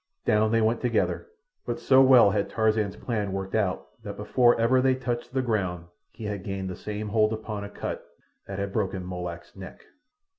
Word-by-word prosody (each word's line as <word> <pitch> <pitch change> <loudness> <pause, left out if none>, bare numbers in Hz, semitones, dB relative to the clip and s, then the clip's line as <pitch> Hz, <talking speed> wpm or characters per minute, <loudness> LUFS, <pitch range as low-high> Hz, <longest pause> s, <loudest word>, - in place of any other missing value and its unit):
Down 110 +1 +3
they 115 0 +3
went 110 +2 +1
together, 125 - 0 0.4
but - - -3
so 130 0 +5
well 130 -6 +7
had 100 0 0
Tarzan's 110 -2 +1
plan 105 -5 -3
worked 95 0 -4
out 100 -4 0 0.2
that - - -7
before 120 -2 +3
ever 125 +3 +4
they 130 0 +3
touched 120 -2 -4
the 130 0 0
ground 95 -7 -1 0.2
he 115 - -12
had 105 -3 -4
gained 95 -1 -4
the - - -6
same 105 +2 -5
hold 110 0 +3
upon 110 -2 -4
Akut 100 - -5 0.4
that 100 - -5
had 100 0 -3
broken 95 -4 -2
Molak's 90 -1 -6
neck. 95 -1 -11
105 Hz, 185 wpm, -26 LUFS, 95-115 Hz, 0.4 s, well